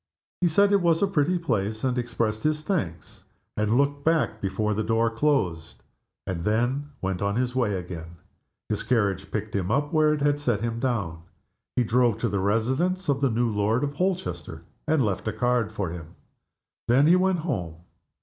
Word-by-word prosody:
He 180 - +4
said 200 +5 +4
it 200 -1 +4
was 170 +1 +3
a - - +4
pretty 180 -1 +1
place, 110 - -2
and 130 -2 +1
expressed 115 -3 -1
his 155 0 0
thanks, 145 - -3 0.3
and 105 +2 +1
looked 140 +1 +1
back 155 -9 +1
before 105 +2 -1
the 105 - -1
door 115 +1 +1
closed, 115 - -1 0.4
and 85 -3 -3
then 120 +8 0
went 95 -1 -2 0.2
his 125 0 0
way 115 -6 +1
again. 85 -2 -7 0.5
His - - -1
carriage 105 -6 0
picked 105 -1 -4
him 95 -2 -1
up 145 +7 0
where 155 -1 +4
it 150 -1 -1
had 145 0 +2
set 120 -8 0
him 115 0 -2
down. 100 -11 -2 0.5
He 125 - +3
drove 120 -1 +2
to 115 - +1
the 100 0 -1
residence 130 - 0
of 140 0 +1
the 135 - +3
new 115 0 +1
Lord 105 +5 +1
Holchester, 90 - -3 0.2
and 155 -5 +3
left 100 +1 -2
a 110 - -1
card 125 -3 +1
for 100 -6 -3
him. 85 -1 -9 0.7
Then 130 +5 +5
he 170 +3 +6
went 185 0 +2
home. 90 - -3
120 Hz, 180 wpm, -26 LUFS, 105-145 Hz, 0.7 s, he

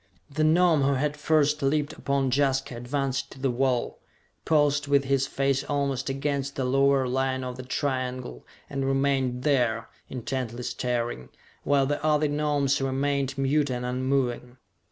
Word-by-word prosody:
The 155 +2 0
Gnome 160 -1 +4
who 140 0 +2
had 145 +2 -1
first 150 0 +2
leaped 145 +2 0
upon 140 -2 -1
Jaska 135 -1 +1
advanced 135 +2 -2
to - - -14
the 135 -1 0
wall, 125 0 0 0.5
paused 145 -2 +2
with 140 -1 +3
his 135 0 +1
face 135 -1 0
almost 140 -2 -1
against 140 0 -2
the 130 - -1
lower 135 0 +3
line 130 +1 -1
of 125 -1 -5
the 130 - -7
triangle, 130 -1 -3 0.2
and 135 -1 -3
remained 135 -2 0
there, 120 -6 +1 0.2
intently 125 -1 -4
staring, 120 - -3 0.3
while 140 -1 +3
the 145 +2 -2
other 155 -1 +3
Gnomes 145 -2 +1
remained 135 0 -1
mute 140 +2 +1
and 125 -1 -3
unmoving. 125 -1 -1
135 Hz, 150 wpm, -26 LUFS, 130-145 Hz, 0.5 s, Gnome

